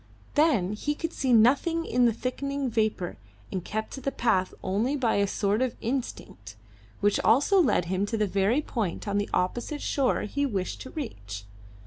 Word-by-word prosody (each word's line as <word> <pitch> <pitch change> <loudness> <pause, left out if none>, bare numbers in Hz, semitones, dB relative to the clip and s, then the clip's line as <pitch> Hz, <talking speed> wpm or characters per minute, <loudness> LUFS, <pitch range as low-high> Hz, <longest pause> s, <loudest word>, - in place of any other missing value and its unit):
Then 265 - +3
he 295 +8 -2
could 330 +2 -4
see 265 -3 0
nothing 280 +9 +4
in 245 0 +3
the - - +3
thickening 270 +3 -3
vapour, 215 -5 -1 0.3
and 185 -3 -3
kept 220 +3 -4
to 270 - -7
the 275 - -1
path 190 -8 +1
only 215 +9 0
by 245 -7 +1
a 200 0 +2
sort 205 +3 0
of 255 -2 0
instinct, 220 - -4 0.5
which 205 0 +3
also 290 - +4
led 220 - +2
him 190 +3 -1
to 225 - -2
the 215 - +2
very 200 +9 +1
point 210 -8 -3
on 200 0 +1
the 205 - -2
opposite 240 - -1
shore 275 -3 +1
he 285 +7 -2
wished 200 -9 -2
to 260 - -8
reach. 100 - -6
225 Hz, 180 wpm, -27 LUFS, 200-275 Hz, 0.5 s, nothing